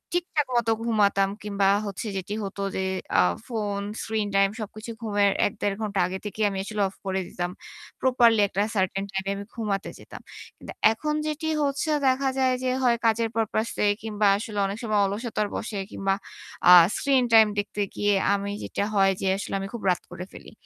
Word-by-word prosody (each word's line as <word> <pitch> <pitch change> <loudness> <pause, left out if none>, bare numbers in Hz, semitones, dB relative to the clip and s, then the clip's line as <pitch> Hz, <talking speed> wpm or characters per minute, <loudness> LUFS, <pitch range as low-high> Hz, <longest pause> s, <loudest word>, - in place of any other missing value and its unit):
ঠিকঠাক 340 -5 0
মত 235 -2 +1 0.2
ঘুমাতাম 200 -4 +2
কিংবা 200 -2 +1 0.2
হচ্ছে 205 +3 -5
যেটি 190 +2 -4
হত 195 0 -6 0.2
যে - - -1 0.4
আ - - +7 0.3
ফোন 210 -4 -2 0.2
স্ক্রিন 220 -2 -1
টাইম 195 0 +4
সবকিছু 215 +1 -7
ঘুমের 205 -2 +2
১-১.৫ 205 -1 -1
ঘণ্টা 205 -3 -2
আগে 190 +1 -5
থেকেই 210 +1 -1
আমি 195 - -5
আসলে 210 +1 -3
অফ 190 - -11
করে 190 0 -1
দিতাম। 175 0 -4 0.5
প্রপারলি 240 -4 +4
একটা 195 - -2
সার্টেন 195 0 0
টাইম 195 0 -2
এ - - +1
আমি 200 - -7
ঘুমাতে 210 -4 -2
যেতাম। - - -11 0.4
কিন্তু - - -10 0.2
এখন 300 +7 -2
যেটি 310 +1 -3 0.2
হচ্ছে 280 +2 -1 0.2
দেখা 265 +1 +2
যায় 260 -1 +3
যে 255 - +1
হয় 235 -1 +4
কাজের 225 0 +2
পারপোজ 220 0 0 0.2
এ - - +4
কিংবা 215 -1 0
আসলে 210 0 -5
অনেক 195 +1 -3
সময় 215 -2 +1
অলসতার 210 +1 -2
বসে 215 -2 -4
কিংবা 195 0 0 0.6
আ - - +10 0.2
স্ক্রিন 270 -2 +2
টাইম 220 -1 +8
দেখতে 205 0 -3
গিয়ে 205 0 +2 0.2
আমি 200 0 -2
যেটা - - -2
হয় 195 -1 +5
যে 195 - 0
আসলে 200 - -6
আমি 195 - -4
খুব 235 - -5
রাত 180 - +1
করে 175 +1 -7
ফেলি। - - -12
210 Hz, 185 wpm, -25 LUFS, 195-230 Hz, 0.6 s, আ